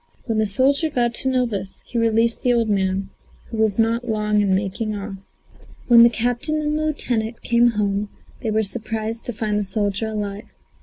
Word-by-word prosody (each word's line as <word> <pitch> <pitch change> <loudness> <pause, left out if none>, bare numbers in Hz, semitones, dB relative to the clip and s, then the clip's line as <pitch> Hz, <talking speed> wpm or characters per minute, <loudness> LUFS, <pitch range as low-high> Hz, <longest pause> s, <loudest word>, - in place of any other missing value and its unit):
When 225 -3 0
the 215 - +2
soldier 275 +9 +2
got 240 -4 0
to 265 - 0
know 255 -1 +2
this, 195 -4 -5
he 235 - -3
released 230 0 +2
the 245 - +3
old 230 -2 +1
man, 190 -1 0 0.4
who 225 - -4
was 220 -2 +2
not 230 +2 +1
long 210 -1 +1
in 195 -2 +2
making 210 +2 -2
off. 200 -1 -6 0.7
When 235 -1 +8
the 235 - +8
captain 245 +7 -1
and 300 0 -1
lieutenant 250 -7 -1
came 240 0 +4
home 205 0 0 0.3
they 230 - -2
were 220 0 +1
surprised 220 +1 -4
to 245 - -3
find 210 -1 -1
the - - 0
soldier 205 +1 -1
alive. 210 -1 -4
220 Hz, 190 wpm, -22 LUFS, 205-240 Hz, 0.7 s, When